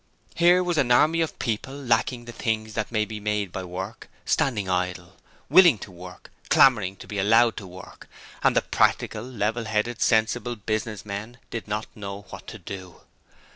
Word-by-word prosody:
Here 175 +2 +5
was 175 -3 0
an 125 - +2
army 155 +7 +4
of 160 - -2
people 120 +3 -3
lacking 120 -2 0
the 120 - -8
things 110 -2 -2
that 110 0 -3
may 110 -2 +1
be 110 -1 -7
made 105 -2 -1
by 95 - -5
work, 95 +5 -7 0.2
standing 120 -11 +1
idle. 90 -1 -2 0.3
Willing 170 - +7
to 100 - -10
work; 90 0 -12 0.2
clamouring 105 -8 +5
to - - -12
be 105 - -4
allowed 115 +4 +4
to 100 - -7
work, 90 +2 -12 0.3
and - - +3
the - - +3
Practical, 105 - +1
Level 115 -2 -2
headed, 110 +2 -1
Sensible 120 +2 +2
Business 110 0 -3
men 105 +4 -6
did 115 -2 -5
not 105 +1 -2
know 100 -1 -7
what - - -10
to 110 - -7
do! 95 -1 -9
110 Hz, 175 wpm, -25 LUFS, 100-120 Hz, 0.3 s, Willing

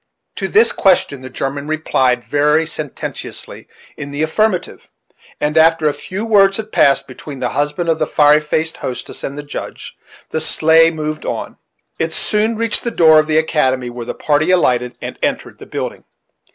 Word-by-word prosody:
To - - -2
this 440 +2 +4
question 175 -8 +2
the 130 - -8
German 140 +3 -4
replied, 130 -5 +1
very 150 +3 +2
sententiously, 155 -3 -7 0.3
in 145 - -7
the 145 +2 -2
affirmative; 185 +3 -1 0.5
and, 150 +1 -1
after 160 -1 +4
a 150 - +1
few 195 +8 -6
words 195 -3 +4
had 220 -1 -6
passed 140 0 +3
between 135 +2 -9
the 125 -1 -2
husband 150 +4 -2
of 160 -1 +1
the 155 - 0
fiery 150 0 +4
faced 155 +1 -2
hostess 125 - -6
and 140 - -5
the 145 - -5
Judge, 145 - -8 0.4
the 160 - -1
sleigh 160 +1 +4
moved 155 -1 -4
on. - - -5 0.4
It - - -1
soon 215 +2 +1
reached 230 0 -1
the 235 - -1
door 160 -8 +5
of 155 - 0
the 155 0 +1
academy, 130 -6 +1
where 120 -1 -8
the - - -4
party 150 +2 +1
alighted 125 -9 +1
and - - -7
entered - - -3
the - - -11
building. - - -5
155 Hz, 180 wpm, -17 LUFS, 140-165 Hz, 0.5 s, door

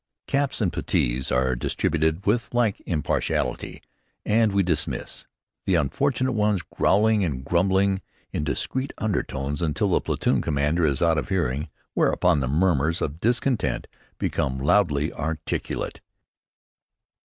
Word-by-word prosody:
Caps 140 -3 0
and 95 -5 +1
puttees 60 +2 0
are 65 0 +2
distributed 80 +7 0
with 115 +3 0
like 115 -5 +1
impartiality, 80 -5 -1 0.4
and 110 0 +3
we 100 0 +2
dismiss, 85 -4 -2 0.4
the 95 - +3
unfortunate 130 - +1
ones 105 -5 +1
growling 105 +1 +3
and 65 -7 -3
grumbling 95 +4 +2 0.3
in - - -1
discreet 130 - -2
undertones 75 -9 -2
until 85 +6 0
the 90 - +2
platoon - - 0
commander 75 +3 +1
is 70 +3 0
out 80 -1 +3
of - - -5
hearing, 75 -7 -1 0.2
whereupon 75 - +3
the 65 - -1
murmurs 80 +1 +2
of 75 +2 -3
discontent 120 +3 0 0.3
become 65 - -1
loudly 75 0 +2
articulate. 80 -1 -3
85 Hz, 125 wpm, -25 LUFS, 75-105 Hz, 0.4 s, and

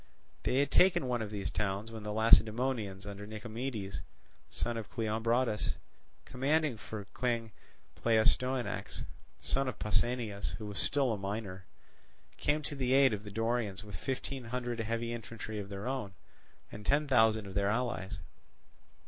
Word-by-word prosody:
They - - 0
had 140 0 +3
taken 180 -7 +5
one 120 -2 0
of 110 - -3
these 100 -2 -3
towns, 100 +2 -1
when 110 -1 -6
the 105 0 -4
Lacedaemonians 110 -2 +4
under 100 0 -6
Nicomedes, 110 -1 -4 0.5
son 120 - -1
of 115 -2 -5
Cleombrotus, 115 +1 +1 0.5
commanding 140 0 +1
for 110 -1 -6
King 115 -2 0 0.4
Pleistoanax, 120 +3 +1 0.3
son 135 0 0
of 130 - -3
Pausanias, 110 -1 0
who 110 - -6
was 105 -1 -2
still 135 -5 +3
a 105 - -3
minor, 95 -2 -4 0.7
came 150 +1 +1
to 145 - -4
the 130 -2 +1
aid 135 -3 +6
of 105 0 -3
the 105 - -7
Dorians 115 -1 -1
with 105 -3 -7
fifteen 130 +5 -3
hundred 120 0 -3
heavy 115 +1 -1
infantry 115 -2 -5
of 100 -1 -6
their 100 +2 -5
own, 125 -7 -3 0.6
and 105 - -8
ten 145 +7 +3
thousand 110 -5 +4
of 95 - -7
their 100 0 +2
allies. 110 -5 -1
115 Hz, 150 wpm, -33 LUFS, 105-125 Hz, 0.7 s, aid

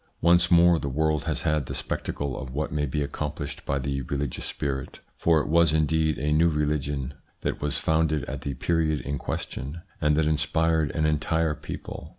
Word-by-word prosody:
Once 85 +1 +4
more 85 -1 +6
the 70 - -3
world 75 +2 0
has - - -2
had 75 -5 +1
the - - -4
spectacle 70 -3 -3
of 65 - -6
what 75 +4 -3
may 75 0 0
be 75 +3 -1
accomplished 75 0 -4
by 70 - +1
the 70 0 -2
religious 70 0 -3
spirit, 70 -2 -4 0.2
for 80 -2 +3
it - - -4
was 85 0 +4
indeed 80 0 +2
a 75 0 -1
new 80 +3 +4
religion 75 -3 -1 0.3
that - - -2
was 75 -1 +1
founded 80 -2 +1
at - - -5
the 70 -1 -3
period 80 +2 +1
in 70 -1 -3
question, 75 +5 -5 0.2
and 75 0 +3
that 80 - +3
inspired 80 +1 +2
an 80 -1 +1
entire 75 +1 +1
people. 75 -1 -7
75 Hz, 185 wpm, -26 LUFS, 70-80 Hz, 0.3 s, more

